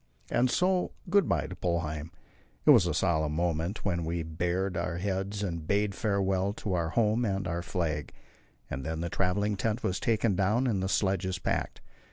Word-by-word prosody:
And 125 +1 +3
so 180 +5 +1 0.2
good 200 0 +4
bye - - +1
to 95 - -7
Polheim. 80 -4 -2 0.6
It - - +9
was - - +6
a - - 0
solemn 80 -3 +1
moment 85 +4 -1
when 85 -4 0
we 85 +1 -2
bared 90 +4 -1
our 85 0 -2
heads 100 +2 -2
and 85 -5 -3
bade 100 0 +1
farewell 100 -2 0
to 100 -2 -3
our 85 -2 0
home 110 +4 +2
and 95 -4 -1
our 85 0 -2
flag. 80 -4 -2 0.6
And 65 - -5
then 80 +3 -3
the 85 - -2
travelling 100 +2 +1
tent 110 +4 -1
was 95 - 0
taken 110 -3 +2
down 105 +7 +2
and 105 -7 +1
the 95 - -1
sledges 95 -2 +1
packed. - - -2
95 Hz, 185 wpm, -29 LUFS, 85-100 Hz, 0.6 s, It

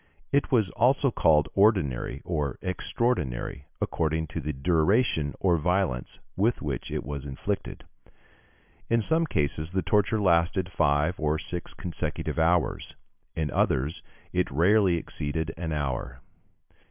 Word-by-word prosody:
It 140 0 +1
was 110 -8 +3
also 130 +4 +3
called 75 -8 +3
ordinary, 75 - +2
or 75 -6 -2
extraordinary, 90 - -1
according 80 -1 -1
to - - -4
the 75 +2 -2
duration 80 - +1
or 90 -3 +2
violence 90 -6 -1 0.2
with 110 +6 +1
which 70 -5 -4
it - - -3
was 70 +1 -5
inflicted. 65 - -4 1.1
In 115 -1 +2
some 160 +4 +2
cases 75 - -1
the 95 -1 0
torture 105 +4 +2
lasted 90 0 +2
five 75 +1 +1
or 75 0 +1
six 85 +1 -5
consecutive 85 -2 -3
hours; 85 +1 +1 0.4
in 80 -2 -1
others, 70 +6 0 0.3
it - - +1
rarely 90 - +4
exceeded 80 0 -3
an 80 -1 -4
hour. 65 -3 -3
80 Hz, 130 wpm, -27 LUFS, 75-95 Hz, 1.1 s, rarely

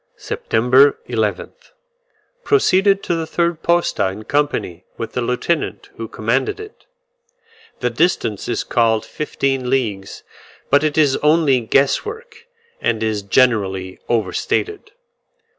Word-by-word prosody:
September 130 +5 +3
11th. - - -3 0.7
Proceeded 200 - +3
to - - -1
the 165 -1 -2
third 170 0 -1
posta 170 - +1
in 100 +3 -6
company 135 - -1
with 115 - -5
the 125 - -1
lieutenant 125 +7 -2
who 115 - -5
commanded 115 - -1
it. 430 +3 -12 0.9
The 125 -1 0
distance 115 - 0
is 120 - -1
called 115 -2 +1
fifteen 135 -4 -2
leagues; 105 -8 -2 0.5
but 145 +2 +5
it 155 -1 0
is 145 -4 +4
only 150 -3 +3
guess 135 +4 +2
work, 455 +1 -10 0.3
and 110 -2 0
is 110 -2 -1
generally 100 -4 +1
overstated. 120 - -1
135 Hz, 120 wpm, -19 LUFS, 110-170 Hz, 0.9 s, but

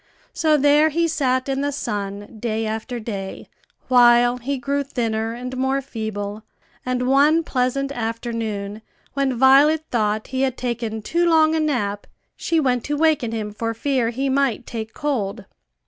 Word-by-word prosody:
So 310 -1 +3
there 295 +2 +4
he 335 +2 +1
sat 260 -5 0
in 270 0 -1
the 285 0 0
sun 205 -4 -5
day 225 0 -2
after 220 +3 -4
day, 200 -4 -6 0.4
while 240 -1 +5
he 270 +3 -3
grew 280 +3 -1
thinner 225 -5 -2
and 250 +1 -6
more 265 +1 0
feeble; 220 -5 -5 0.4
and 250 0 -1
one 295 +5 +4
pleasant 275 0 -1
afternoon, 225 -3 -4 0.3
when 270 -3 0
Violet 285 +5 +5
thought 215 -2 0
he 260 - 0
had 260 -2 0
taken 230 -3 -3
too 340 +7 +1
long 315 -1 +4
a 320 - +1
nap, 210 -10 -1 0.3
she 330 - 0
went 250 -5 +1
to 295 0 -2
waken 305 -7 +2
him 215 -2 -4
for 230 +1 -3
fear 255 -1 0
he 265 +4 -2
might 265 -3 +1
take 220 -2 -6
cold. 225 -8 -2
250 Hz, 160 wpm, -22 LUFS, 220-280 Hz, 0.4 s, while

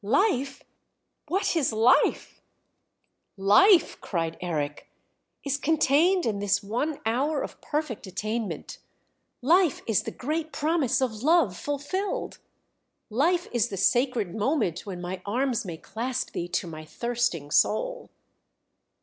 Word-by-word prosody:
"Life, 275 - +1 0.6
what 365 +3 0
is 305 -7 +2
Life?" 230 +5 +2 1.0
"Life," 330 - +5
cried 165 -3 -2
Eric, 150 -5 -3 0.5
"is 280 -1 -1
contained 320 +4 +3
in 210 -3 -1
this 205 +1 +1
one 250 +9 -2
hour 275 +6 0
of - - -8
perfect 295 -9 -3
attainment. 215 +3 -4 0.6
Life 340 +2 +3
is 225 -5 +2
the - - -5
great 315 +4 -3
promise 290 -5 +1
of 220 -4 -3
love 300 - +3
fulfilled. 290 - -3 0.7
Life 340 +10 +2
is 240 -2 +1
the 195 - -5
sacred 230 -1 +1
moment 215 - -1
when 180 -3 -5
my 180 +1 -5
arms 240 +2 -1
may 170 -3 -6
clasp 235 +8 -4
thee 175 - -3
to 175 +1 -2
my 155 -2 -8
thirsting 235 -5 -2
soul! - - +1
240 Hz, 125 wpm, -26 LUFS, 200-300 Hz, 1.0 s, Life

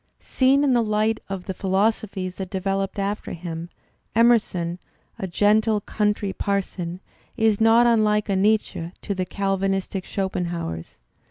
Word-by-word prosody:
Seen 270 +2 +2
in 275 -3 +3
the 240 - +4
light 215 0 +1
of 195 -2 -5
the 190 - -3
philosophies 190 -1 -1
that 190 -2 -5
developed 195 +1 -2
after 200 +1 -2
him, 170 -1 -6 0.5
Emerson, 205 -7 +3 0.4
a 190 - -3
gentle 210 +4 +3
country 205 -1 -1
parson, 185 -3 -3 0.4
is 220 -2 +2
not 225 +2 +6
unlike 215 -2 +3
a 200 - +1
Nietzsche 190 -4 +1
to 200 - -2
the 185 -1 -2
Cal. 195 0 -1
vanistic 195 0 -1
Schopenhauers. 175 - -3
200 Hz, 140 wpm, -23 LUFS, 185-215 Hz, 0.5 s, not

